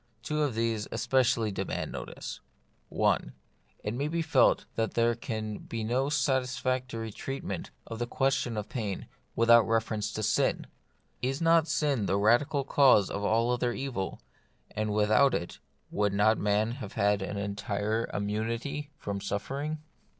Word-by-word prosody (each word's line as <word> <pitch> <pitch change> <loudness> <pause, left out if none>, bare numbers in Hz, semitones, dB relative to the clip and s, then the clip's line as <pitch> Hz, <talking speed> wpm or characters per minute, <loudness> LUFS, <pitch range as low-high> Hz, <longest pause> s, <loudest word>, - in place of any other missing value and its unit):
Two 150 0 -1
of 145 -6 0
these 115 -2 0
especially 125 -2 +2
demand - - -3
notice. - - -6 0.5
1. - - +1 0.5
It 105 - -2
may 140 +5 -1
be 165 +1 -1
felt 160 - +4
that 115 -1 -1
there 115 0 +3
can 110 -3 -4
be 115 -1 -5
no 125 +5 +1
satis 130 -3 +1
factory 125 -3 -2
treatment 135 +6 -5 0.2
of 115 - -7
the 120 - -1
question 130 -3 0
of 105 -1 -3
pain 105 -6 -4 0.3
without 115 +1 +7
a - - -5
reference 110 -1 0
to 110 - -3
sin. 110 - +1 0.6
Is 135 +3 -1
not 165 -1 +4
sin 140 -12 +1
the 95 +2 +2
radical 120 +7 +3
cause 130 -8 +5
of 100 - -3
all 115 +3 +2
other 125 0 0
evil, 120 -9 -4 0.5
and 110 0 -2
without 105 +6 +4
it 85 - -4 0.3
would 105 -1 +1
not 105 +2 +3
man 105 +2 +1
have 120 -5 -7
had 100 0 +2
an 100 +1 -4
entire 105 +2 -2
immunity 115 +8 -2
from 100 -5 -4
suffering 140 +10 -3
115 Hz, 155 wpm, -29 LUFS, 105-130 Hz, 0.6 s, without